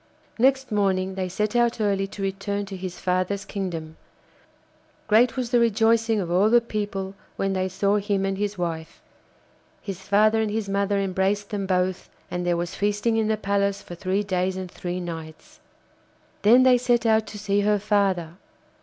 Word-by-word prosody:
Next 265 0 +2
morning 190 -2 +1
they 185 -1 -3
set 210 +5 -2
out 240 -1 +2
early 200 -2 +1
to 195 0 -7
return 200 +1 -2
to 195 0 -7
his 185 -1 -6
father's 185 +2 -1
kingdom. 165 -5 -5 1.1
Great 235 +5 +4
was 245 -2 -2
the 245 - +4
rejoicing 225 -1 +3
of 175 -3 -3
all 190 +4 +4
the 240 +1 +6
people 205 -4 -4 0.2
when 195 0 -1
they 185 0 -1
saw 200 +2 +1
him 200 -1 0
and 195 0 -1
his 205 0 -3
wife; 165 -2 -4 0.8
his 195 -2 -7
father 215 +3 +3
and 220 - 0
his 215 -1 -2
mother 200 +1 0
embraced 195 +1 0
them 200 -2 -2
both, 185 0 0 0.2
and 180 0 -2
there 175 -1 +2
was 175 0 -3
feasting 210 +3 0
in 220 -1 +1
the 220 0 +1
palace 200 -1 0
for - - -9
three 185 +3 -1
days 185 -1 -1
and 185 -2 -6
three 180 0 -4
nights. 165 -3 -8 0.8
Then 240 +5 +6
they 255 -1 +5
set 240 -1 +1
out 220 -1 +3
to 210 - -8
see 205 -1 0
her 210 +1 +2
father. 190 -5 0
200 Hz, 180 wpm, -24 LUFS, 185-215 Hz, 1.1 s, the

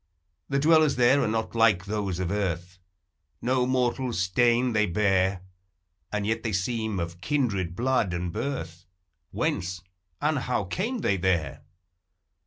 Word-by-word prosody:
The 140 - +1
dwellers 155 0 +4
there 125 +3 +4
are - - +1
not 110 +1 -2
like 110 -5 +3
those 100 -3 -2
of 90 -1 -2
earth, 95 -2 -3 0.3
— - - -51 0.3
No 125 0 +1
mortal 125 -1 0
stain 120 +6 +2
they 105 -1 +2
bear, 95 -1 +1 0.3
— 90 -2 -50
And 105 -1 -1
yet 110 +1 0
they 110 -2 -3
seem 110 +1 -1
of 85 +1 -5
kindred 100 - -1
blood 125 -4 +1
and 85 0 -3
birth; 90 - -4 0.4
Whence 90 0 -2 0.4
and 150 -1 +1
how 125 -4 -1
came 210 - -3
they 100 - +1
there? 85 -6 0
105 Hz, 150 wpm, -26 LUFS, 90-125 Hz, 0.4 s, dwellers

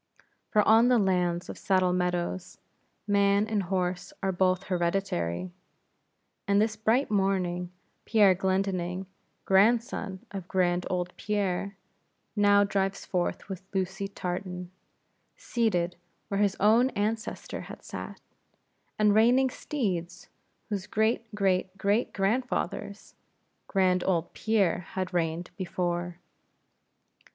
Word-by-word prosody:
For 210 -1 +3
on 225 +2 +6
the 250 -1 +5
lands 180 -3 +1
of - - -8
Saddle 185 -2 +2
Meadows, 180 0 -2 0.5
man 200 0 +3
and 215 -2 0
horse 180 -1 -2
are 190 - +2
both 185 0 +1
hereditary; 170 - -1 1.0
and 200 0 +4
this 215 0 +1
bright 220 +4 +1
morning 185 -3 0 0.3
Pierre 210 -4 +5
Glendinning, 185 -1 -1 0.4
grandson 200 -1 +2
of 190 -3 -6
grand 180 -1 +1
old 180 -1 -2
Pierre, 200 -1 -2 0.6
now 205 -1 +5
drives 195 -1 -1
forth 180 -3 -2
with 190 -3 -6
Lucy 190 +1 -1
Tartan, 180 -1 -5 0.7
seated 180 -7 0 0.3
where 200 - -1
his 200 -2 +2
own 225 +5 +5
ancestor 220 +2 -3
had - - -10
sat, - - -7 0.8
and 210 -1 +4
reining 245 +4 +4
steeds, 185 - -3 0.4
whose 200 -2 -3
great 220 +2 +1
great 190 -1 0
great 200 +4 +1
grandfathers 210 -1 -2 0.5
grand 185 -2 +2
old 175 -3 0
Pierre 210 -6 +1
had 185 +2 -5
reined 170 0 -1
before. 175 -2 -2
190 Hz, 110 wpm, -28 LUFS, 180-205 Hz, 1.0 s, on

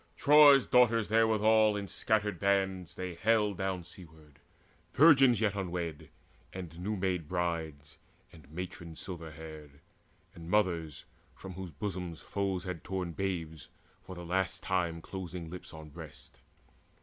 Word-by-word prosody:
Troy's 145 -2 +7
daughters 115 -4 +4
therewithal 110 -1 +4
in 100 -1 -4
scattered 105 -2 -1
bands 95 -3 0
They 90 -1 -5
haled 105 +1 +1
down 95 -2 -2
seaward 80 -4 -15 0.5
virgins 135 -6 +6
yet 105 -3 +2
unwed, 85 -5 -4 0.4
And 85 -3 -8
new 105 +4 -2
made 90 -4 -1
brides, 80 -4 -3 0.3
and 80 -4 -16
matrons 85 -1 -7
silver 85 -4 -6
haired, 75 -2 -11 0.5
And 85 -3 -10
mothers 85 -7 0 0.3
from 95 - -9
whose 95 0 -7
bosoms 90 +1 -5
foes 95 -3 -2
had 90 -4 -6
torn 95 -2 -3
Babes 80 -5 -4 0.3
for 95 - -10
the 90 0 -8
last 95 +2 -1
time 85 -3 -1
closing 90 -3 -7
lips 90 - -9
on 80 -1 -10
breasts. 65 -2 -11
90 Hz, 135 wpm, -31 LUFS, 85-100 Hz, 0.5 s, Troy's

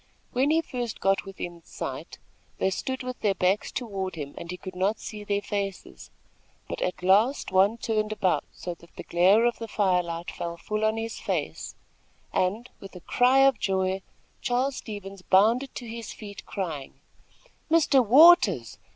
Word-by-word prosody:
When 265 +3 +2
he 320 +2 +3
first 245 -6 -4
got 195 0 +1
within 175 -3 -7
sight - - -7 0.4
they 190 - +1
stood 260 +7 -3
with 255 0 -5
their 200 -2 +1
backs 185 +3 +1
toward 195 -6 -4
him 145 -3 -6
and 170 - -8
he 180 - -5
could 185 0 -8
not 195 +4 0
see 210 -1 -7
their 205 0 -1
faces; 200 -2 -5 0.6
but - - -5
at 180 0 -2
last 210 +9 +3
one 195 +4 +4
turned 215 -2 -1
about 200 -4 +1
so 175 - -6
that 170 0 -19
the - - -7
glare 190 +7 +4
of 240 - 0
the 230 - -5
fire 190 -4 +2
light 170 0 -5
fell 170 0 -5
full 215 +5 -3
on 215 +1 +2
his 225 0 -4
face, - - -3 0.6
and, 210 +7 0
with 195 -1 -11
a 180 - -9
cry 255 +8 +4
of 270 -4 +3
joy, 190 0 0 0.4
Charles 255 +1 0
Stevens 200 -3 -8
bounded 225 +9 +3
to 245 - -6
his 230 0 -7
feet, 205 -2 -10
crying: 160 -9 -5 0.7
"Mr. 300 -5 +4
Waters! 240 - +6
205 Hz, 170 wpm, -26 LUFS, 185-235 Hz, 0.7 s, Waters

